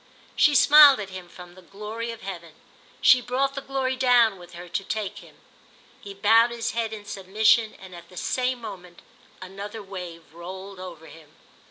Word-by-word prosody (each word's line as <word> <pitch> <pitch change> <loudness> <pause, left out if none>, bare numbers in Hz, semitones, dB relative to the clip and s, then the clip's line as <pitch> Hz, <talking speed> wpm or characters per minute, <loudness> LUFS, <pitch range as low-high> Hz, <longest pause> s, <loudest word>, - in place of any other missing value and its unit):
She 295 - +4
smiled 290 -1 +8
at 195 -2 -6
him 185 -2 -9
from 180 0 -13
the 185 - -16
glory 210 +6 -7
of 230 -1 -8
heaven—she 185 - -1
brought 265 +3 -1
the 275 - -5
glory 265 -1 -2
down 245 -6 +3
with 175 0 -14
her 175 +1 -10
to 175 +3 -3
take 210 0 -4
him. - - -17 0.7
He 200 -1 -10
bowed 225 +4 +4
his 230 -1 -3
head 230 -1 -2
in 210 -2 -8
submission 215 +3 +1
and 190 -1 -13
at 170 -1 -12
the 180 - -15
same 255 +4 -1
moment 180 -5 -10 0.4
another 200 +3 -8
wave 175 -5 -9
rolled 185 +3 -9
over 175 -4 -10
him. 155 -2 -16
200 Hz, 175 wpm, -24 LUFS, 180-235 Hz, 0.7 s, smiled